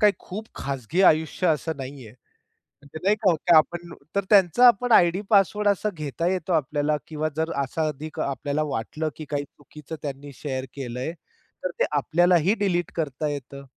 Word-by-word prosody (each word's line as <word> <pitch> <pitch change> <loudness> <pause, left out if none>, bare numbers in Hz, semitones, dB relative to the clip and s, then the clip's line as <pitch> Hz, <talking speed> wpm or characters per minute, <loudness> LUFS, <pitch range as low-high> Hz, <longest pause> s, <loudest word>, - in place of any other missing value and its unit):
काही 210 -2 +6
खूप 215 +4 -8
खाजगी 140 - -2
आयुष्य 160 +1 +3
असं 160 0 0
नाहीये. 130 -4 -8 0.9
नाही 200 +3 +4
का 170 -2 +5
आपण 170 +2 0 0.2
तर 200 - +2
त्यांचा 200 +4 +6
आपण 240 +2 +3
आयडी 175 -2 +5
पासवर्ड 205 0 +3
असा 205 +1 +2
घेता 155 +2 -2
येतो 180 -1 -1
आपल्याला 150 0 +1
किंवा 155 0 -2
जर 160 +1 0
असा 155 +4 -2
अधिक 155 +1 -6
आपल्याला 140 +2 -1
वाटलं 150 +3 -3
की 155 - -8
काही 145 -1 -1
चुकीचं 150 +2 -11
त्यांनी 140 0 -6
शेअर 130 -2 -4
केलंय, 130 +1 -4 0.5
तर 185 - 0
ते - - +4
आपल्यालाही 175 +4 +3
डिलीट 175 -4 0
करता 155 -2 -2
येतं 140 -1 -7
155 Hz, 155 wpm, -25 LUFS, 145-180 Hz, 0.9 s, काही